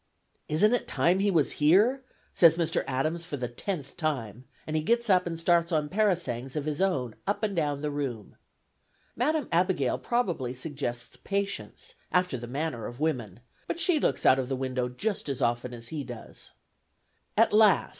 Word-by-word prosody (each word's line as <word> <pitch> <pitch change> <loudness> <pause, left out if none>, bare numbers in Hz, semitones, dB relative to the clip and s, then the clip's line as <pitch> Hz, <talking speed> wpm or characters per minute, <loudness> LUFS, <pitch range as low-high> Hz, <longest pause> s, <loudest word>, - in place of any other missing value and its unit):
"Isn't 205 +9 +3
it 245 - 0
time 180 +3 +2
he 200 +1 +2
was 165 -6 +2
here?" 210 - +4 0.3
says 165 -1 +6
Mr. 170 -2 +1
Adams 155 +6 -1
for 160 -4 -5
the 125 -2 -3
tenth 140 +3 -5
time; 130 - -3 0.2
and 155 - -4
he 155 - +2
gets 235 +6 +2
up 180 -1 +4
and 165 -1 -4
starts 170 +1 +2
on 150 -2 0
parasangs 170 - 0
of 150 -2 -2
his 155 +2 -2
own 135 - 0
up 200 +2 -1
and 205 -2 0
down 145 -4 0
the 150 0 -2
room. 135 -7 -4 0.8
Madam 305 -3 0
Abigail 170 -7 +1
probably 175 - -1
suggests 130 -4 -5
patience, 200 - -4 0.2
after 180 -5 +2
the 120 -1 -6
manner 135 -2 -3
of 120 - -9
women, 120 - -2 0.3
but 335 - -3
she 330 -1 +3
looks - - 0
out 130 - +6
of 130 -1 -3
window 130 -2 -1
just 195 - -3
as 135 -2 -2
often 120 -1 0
as 115 -1 -10
he 155 -3 -4
does. 120 -3 -10 0.9
At 225 -1 +4
last! 210 -3 +5
155 Hz, 175 wpm, -28 LUFS, 130-190 Hz, 0.9 s, says